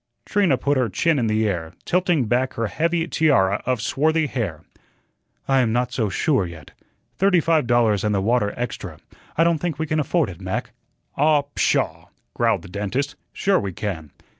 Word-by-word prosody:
Trina 185 -10 +2
put 145 +2 0
her 125 -3 +1
chin 155 - +1
in 115 - 0
the 110 0 +1
air, 85 -4 -3
tilting 175 -7 +1
back 125 +4 0
her 115 - -1
heavy 165 +7 0
tiara 125 - +2
of 125 -4 0
swarthy 155 +6 +1
hair. 110 - -3 0.8
"I 135 -1 +3
am 120 -3 +2
not 125 +1 0
so 115 -5 -1
sure 125 - +1
yet. 80 -4 -11 0.5
Thirty 195 -2 +4
five 160 -5 +2
dollars 115 -5 +3
and 105 -1 +1
the - - +2
water 105 +1 +1
extra. 125 0 -5 0.4
I 165 - +5
don't 170 -2 +2
think 165 -3 -2
we 160 - -1
can 155 0 -1
afford 150 - +1
it, 85 - -12
Mac." - - -3 0.5
"Ah, 150 0 +4
pshaw!" - - 0 0.3
growled - - +1
the - - -10
dentist, 105 +9 -2 0.2
"sure 195 0 +1
we 100 -3 -4
can." 85 -6 -4
125 Hz, 185 wpm, -22 LUFS, 105-155 Hz, 0.8 s, I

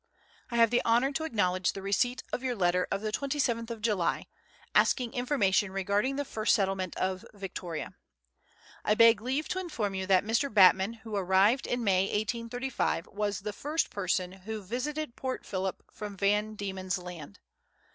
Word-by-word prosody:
I 235 - -4
have 230 -1 +5
the 245 - +2
honour 240 +4 +3
to 315 +3 -2
acknowledge 185 -8 +1
the 195 - -7
receipt 245 +6 0
of - - -1
your 255 -2 -1
letter 180 -2 +2
of 195 - -1
the 215 0 -2
27th 245 -3 -1
of 230 -2 -6
July, 205 -7 0 0.5
asking 245 -2 +3
information 210 -7 +1
regarding 200 +7 0
the 285 +1 -2
first 220 -3 +2
settle 195 -3 +1
ment 185 -2 -4
of 185 0 -1
Victoria. 180 -4 -6 0.9
I 210 - +2
beg 230 -1 +6
leave 265 +6 -1
to 375 - -1
inform 240 - -3
you 190 -1 -3
that 190 0 +4
Mr. 235 +6 +1
Batman, 195 +1 +6
who 220 -2 -4
arrived 195 +6 +3
in 245 -1 -1
May 190 -3 +3
1835, 230 -1 -2
was 205 -2 -2
the 210 +1 -4
first 300 +8 -1
person 185 -2 -1
who 205 +3 -7
visited 255 +6 -3
Port 260 -1 -4
Phillip 190 -1 -3
from 205 -2 -7
Van 210 +2 +1
Diemen's 190 -2 -3
Land. 175 - -9
210 Hz, 170 wpm, -29 LUFS, 190-245 Hz, 0.9 s, beg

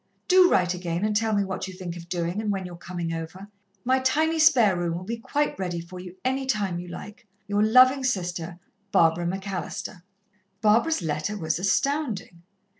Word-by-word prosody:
Do 365 -1 +6
write 180 -1 +2
again 175 +1 -2
and 215 0 0
tell 220 +1 +1
me 200 - +2
what 190 -1 -4
you 190 - -9
think 180 -2 -6
of 170 0 -10
doing 175 +3 -2
and 210 -1 -1
when 195 -2 -3
you're 175 -1 -8
coming 170 -1 -5
over. 165 +4 -7 0.4
My 260 +1 +3
tiny 315 +5 +1
spare 250 - +5
room 175 -1 -1
will 180 - -7
be 230 +5 -4
quite 290 0 -1
ready 180 -2 -2
for 170 +2 -9
you, 180 0 -9
any 265 +1 0
time 200 -8 0
you 180 - -8
like. 210 +5 -10 0.2
"Your 205 0 +1
loving 255 +5 +6
sister, 175 -7 -2 0.3
"BARBARA 165 +1 +3
MCALLISTER." 190 -1 -5 0.6
Barbara's 225 - +3
letter 155 +7 -2
was 160 -2 -1
astounding. 210 - -1
190 Hz, 185 wpm, -25 LUFS, 175-230 Hz, 0.6 s, Do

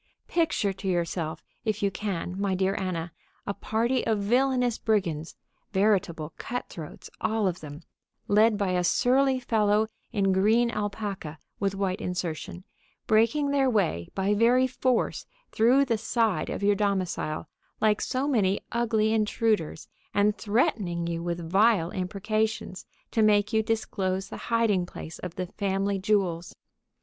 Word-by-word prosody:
Picture 315 - +1
to 195 +1 -7
yourself, 170 -3 -2 0.2
if 215 -2 -1
you 200 - +2
can, 190 -2 -4
my 195 -2 +1
dear 190 +1 +1
Anna, 175 -4 -3 0.3
a 200 - -2
party 235 +5 0
of 220 -1 +2
villainous 245 +3 +1
brigands, 170 -8 -1 0.4
veritable 185 -6 +1
cutthroats, 175 -10 -6
all 220 -2 +1
of 180 -1 -2
them, 150 +1 -9 0.4
led 215 +1 +4
by 200 -2 0
a 180 -1 +1
surly 260 +7 +3
fellow 215 -3 +2 0.3
in 200 -4 +2
green 220 +5 +3
alpaca 200 -7 -4 0.2
with 195 -1 0
white 195 +1 -1
insertion, 180 -1 -4 0.4
breaking 230 +7 +3
their 275 -2 +3
way, 175 - 0
by 195 +1 +1
very 240 +4 +4
force, 255 -1 0 0.2
through 250 +5 +4
the 230 -4 0
side 225 -2 0
of - - -4
your 205 +1 +4
domicile, 190 -6 -1 0.3
like 210 -1 +2
so 260 +2 -1
many 205 -8 +2
ugly 225 -2 +1
intruders, 215 -6 0 0.3
and 205 +1 +3
threatening 205 -6 0
you 170 0 -2
with 170 -1 -3
vile 195 -1 +3
imprecations 200 +1 -2 0.2
to 225 - +1
make 210 0 +3
you 220 - +4
disclose 195 -4 -2
the - - -7
hiding 220 -6 +2
place 160 -2 -9
of 180 -2 -6
the 185 - -2
family 195 +1 -1
jewels. 185 -4 0
205 Hz, 140 wpm, -27 LUFS, 185-225 Hz, 0.4 s, led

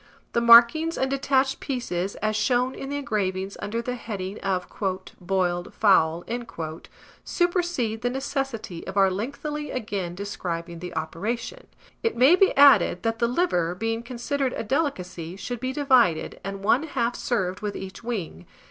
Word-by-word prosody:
The 235 - +2
markings 235 +8 +7
and 265 0 0
detached 270 0 +1
pieces, 200 -8 -3
as 215 0 +1
shown 245 +4 +1
in 270 - -7
the 285 - -3
engravings 200 -7 -2
under 230 +3 -3
the 250 - -3
heading 205 -5 -5
of 185 -2 -1 0.6
"Boiled 175 -1 -1
Fowl," 175 -5 +3 1.0
supersede 345 - 0
the 245 - 0
necessity 265 - -4
of 190 +1 -5
our 195 -1 +5
lengthily 295 +9 -4
again 200 -7 -3
describing 170 -4 -5
the 180 -1 -7
operation. 215 - -4 0.3
It 455 - -1
may 265 +8 +7
be 385 +1 +4
added, 245 -11 +6
that 225 -1 -1
the 235 - +3
liver, 205 - 0
being 225 +3 -2
considered 255 +3 -2
a - - -3
delicacy, 185 - -2
should 240 +5 -5
be 255 +2 -2
divided, 255 - +2
and 195 +1 -6
one 230 +6 +4
half 245 -6 -1
served 185 -6 -2
with 210 -1 -3
each 190 +3 -8
wing. 190 - -5
225 Hz, 150 wpm, -25 LUFS, 190-265 Hz, 1.0 s, markings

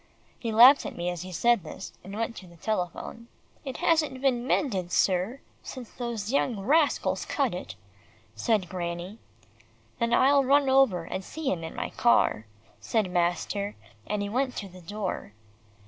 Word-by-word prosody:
He 230 - -3
laughed 245 +6 +8
at - - -8
me 175 +1 -1
as 175 -2 -5
he 185 0 -7
said 235 +5 +3
this, 155 - -8
and 195 +2 -8
went 230 +1 -2
to 185 - -10
the 170 - -16
telephone. 215 +4 -4 0.4
"It 265 -3 -5
hasn't 315 -6 +1
been 255 -2 +1
mended, 190 -14 0
sir, 195 +8 +1 0.2
since 250 -4 -9
those 235 -3 -4
young 245 -6 +1
rascals 290 +9 +2
cut - - 0
it," - - -6 0.6
said 215 -6 +1
Granny. 175 +3 -5 0.8
"Then 235 0 0
I'll 275 +3 +5
run 275 +1 +4
over 265 -10 +4
and 190 +3 -5
see 310 +7 -3
him 165 -3 -3
in 160 - -7
my 245 - -4
car," 115 - +2 0.3
said 215 -5 0
master, 180 +3 -1 0.3
and 210 -1 -1
he - - -2
went 255 +4 -1
to 200 - -5
the 185 -1 -13
door. 190 - -5
215 Hz, 165 wpm, -27 LUFS, 180-255 Hz, 0.8 s, laughed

